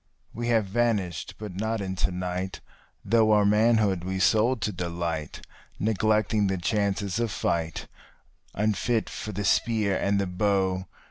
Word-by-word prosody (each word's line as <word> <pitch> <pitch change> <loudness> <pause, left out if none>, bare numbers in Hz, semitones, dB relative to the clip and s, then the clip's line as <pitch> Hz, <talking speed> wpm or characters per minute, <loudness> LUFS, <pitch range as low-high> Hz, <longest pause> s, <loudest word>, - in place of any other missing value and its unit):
We 120 +1 -4
have 115 -3 +3
vanished, 100 -6 -1
but 105 -3 -7
not 110 +3 -1
into 95 -2 -1
night, 90 +1 -4 0.5
though 110 -1 +4
our 105 -1 +4
manhood 105 -3 +3
we 95 +1 -3
sold 110 +6 +3
to 105 - 0
delight, 85 -4 -4 0.3
Neglecting 110 0 +1
the 95 0 0
chances 100 +1 -1
of 120 -1 0
fight, 85 -4 -2 0.7
unfit 110 +2 0
for 110 - -5
the 105 -1 -3
spear 105 -4 +2
and 100 +1 +1
the 100 - 0
bow. 95 0 0
100 Hz, 140 wpm, -26 LUFS, 95-110 Hz, 0.7 s, though